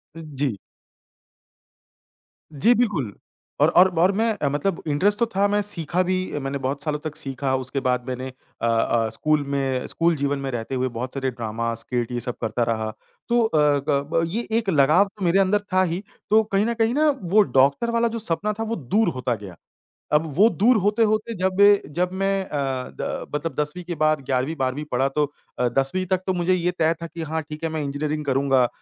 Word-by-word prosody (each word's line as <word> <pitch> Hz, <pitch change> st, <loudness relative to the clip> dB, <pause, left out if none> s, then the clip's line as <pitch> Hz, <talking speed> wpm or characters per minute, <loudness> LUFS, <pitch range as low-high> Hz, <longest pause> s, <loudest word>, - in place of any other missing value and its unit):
उ, 165 Hz, -, -8 dB, 0.2 s
जी। 130 Hz, -8 st, 0 dB, 2.0 s
जी, 185 Hz, -, +4 dB
बिल्कुल। 170 Hz, -, 0 dB, 0.5 s
और -, -, +6 dB
और 185 Hz, -, +6 dB
और 180 Hz, +3 st, +5 dB
मैं 215 Hz, -5 st, 0 dB
मतलब 155 Hz, +6 st, -1 dB
इंटरेस्ट 195 Hz, +8 st, +2 dB
तो 235 Hz, -, +4 dB
था 200 Hz, +1 st, +3 dB
मैं 205 Hz, +1 st, +1 dB
सीखा 180 Hz, -4 st, -1 dB
भी, 185 Hz, -4 st, -2 dB
मैंने 135 Hz, 0 st, -3 dB
बहुत 135 Hz, +2 st, -3 dB
सालों 150 Hz, -1 st, -1 dB
तक 150 Hz, 0 st, -6 dB
सीखा। 135 Hz, 0 st, -2 dB
उसके 130 Hz, +1 st, -3 dB
बाद 125 Hz, -2 st, 0 dB
मैंने 130 Hz, 0 st, -4 dB
अ -, -, -13 dB, 0.3 s
अ, 115 Hz, 0 st, +1 dB
स्कूल 155 Hz, +4 st, +1 dB
में, 135 Hz, -2 st, -1 dB
स्कूल 170 Hz, 0 st, +1 dB
जीवन 140 Hz, -1 st, -1 dB
में 135 Hz, 0 st, -3 dB
रहते 120 Hz, +2 st, -4 dB
हुए 130 Hz, 0 st, 0 dB
बहुत 125 Hz, +2 st, -4 dB
सारे 135 Hz, -1 st, -2 dB
ड्रामा, 115 Hz, 0 st, -3 dB
स्कीट 120 Hz, +1 st, -3 dB
ये 120 Hz, -, -2 dB
सब 120 Hz, +1 st, -3 dB
करता 115 Hz, +1 st, 0 dB
रहा। 110 Hz, -1 st, -2 dB, 0.4 s
तो 240 Hz, 0 st, +3 dB
अ, 150 Hz, -8 st, +3 dB
ग 140 Hz, -1 st, +3 dB
ब 165 Hz, -, +3 dB
ये 225 Hz, +8 st, -3 dB
एक 220 Hz, -4 st, -4 dB
लगाव 155 Hz, +3 st, +5 dB
तो 195 Hz, -, -3 dB
मेरे 175 Hz, +3 st, +3 dB
अंदर 195 Hz, +2 st, +3 dB
था 185 Hz, 0 st, +4 dB
ही 180 Hz, +2 st, -2 dB, 0.3 s
तो 220 Hz, +1 st, +5 dB
कहीं 205 Hz, 0 st, 0 dB
न 235 Hz, -, 0 dB
कहीं 225 Hz, 0 st, +1 dB
ना 305 Hz, +3 st, +3 dB
वो 190 Hz, +4 st, +4 dB, 0.2 s
डॉक्टर 140 Hz, -, +3 dB
वाला 235 Hz, 0 st, +2 dB
जो 230 Hz, 0 st, -4 dB
सपना 210 Hz, +1 st, -1 dB
था 225 Hz, -, 0 dB
वो 225 Hz, +1 st, -2 dB
दूर 200 Hz, -, +1 dB
होता 125 Hz, -1 st, -1 dB
गया। 100 Hz, -4 st, -10 dB, 0.6 s
अब 150 Hz, +2 st, +4 dB
वो 210 Hz, +4 st, +7 dB
दूर 230 Hz, +3 st, +3 dB
होते 210 Hz, +3 st, +2 dB
होते 215 Hz, +2 st, -1 dB
जब 185 Hz, 0 st, 0 dB, 0.4 s
जब 180 Hz, +1 st, +1 dB
मैं 195 Hz, 0 st, 0 dB
अ, 135 Hz, -4 st, -3 dB
द -, -, -5 dB
मतलब 160 Hz, +2 st, -2 dB
10वीं 150 Hz, +4 st, -2 dB
के 175 Hz, -1 st, -5 dB
बाद 155 Hz, -1 st, +3 dB
11वीं 135 Hz, +4 st, -1 dB
12वीं 135 Hz, +1 st, -2 dB
पढ़ा 130 Hz, +2 st, +2 dB
तो 150 Hz, +2 st, 0 dB, 0.4 s
अ, 125 Hz, -, +2 dB
10वीं 135 Hz, +9 st, 0 dB
तक 185 Hz, 0 st, 0 dB
तो 190 Hz, -, +2 dB
मुझे 175 Hz, +1 st, +1 dB
ये 180 Hz, -1 st, +1 dB
तय 160 Hz, +1 st, +3 dB
था 170 Hz, -, -4 dB
कि 165 Hz, +1 st, -8 dB
हाँ 160 Hz, 0 st, -2 dB
ठीक 150 Hz, +1 st, -9 dB
है, 165 Hz, -, 0 dB
मैं 155 Hz, -1 st, -3 dB
इंजीनियरिंग 150 Hz, +2 st, -3 dB
करूँगा 135 Hz, -2 st, +2 dB
155 Hz, 210 wpm, -23 LUFS, 135-190 Hz, 2.0 s, वो